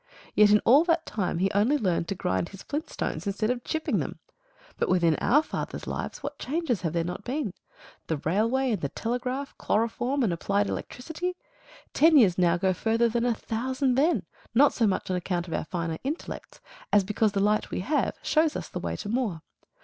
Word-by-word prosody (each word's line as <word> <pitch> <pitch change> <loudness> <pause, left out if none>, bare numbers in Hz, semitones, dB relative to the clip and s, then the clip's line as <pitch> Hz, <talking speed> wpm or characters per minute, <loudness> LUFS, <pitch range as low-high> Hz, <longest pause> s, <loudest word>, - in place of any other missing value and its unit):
Yet 210 0 +6
in 210 0 +5
all 275 +7 +7
that 330 -2 +2
time 190 -5 -2
he 190 +3 +1
only 220 +9 +3
learned 180 -8 0
to 195 - -2
grind 95 - -1
his 195 - -11
flint 310 +2 -4
stones 160 +5 -3
instead 215 +3 0
of 245 -1 -3
chipping 315 0 -1
them. - - -4 0.6
But - - +1
within 170 -3 +3
our 295 +5 +3
father's - - -5
lives - - -5
what 285 0 -5
changes 285 - -1
have 165 -3 -2
there 170 -1 +1
not 180 +4 -5
been? 250 -5 -2 0.5
The 160 - -1
railway 230 - +1
and 205 -6 -1
the 140 - -1
telegraph, 250 - -3
chloroform 245 +5 0
and 200 -7 +1
applied 200 +4 0
electricity. 330 - -4 0.6
Ten 315 +1 +6
years 190 -9 +5
now 175 -1 +4
go 190 +1 +1
further 230 +5 +1
than 235 +1 0
a 235 - +1
thousand 260 +4 -1
then, 295 +7 +2 0.3
not 285 +4 +6
so 230 - +2
much 190 -1 -1
on - - +1
account 180 -1 -2
of 165 - -5
our - - -1
finer 165 -1 -3
intellects 290 +6 -6 0.3
as 205 -1 +5
because 210 +1 +1
the 200 - 0
light 210 +2 +2
we - - -3
have 290 +9 0
shows 315 -1 +2
us - - -5
the - - -5
way - - -3
to - - -6
more. 210 -8 -1
220 Hz, 205 wpm, -27 LUFS, 185-270 Hz, 0.6 s, all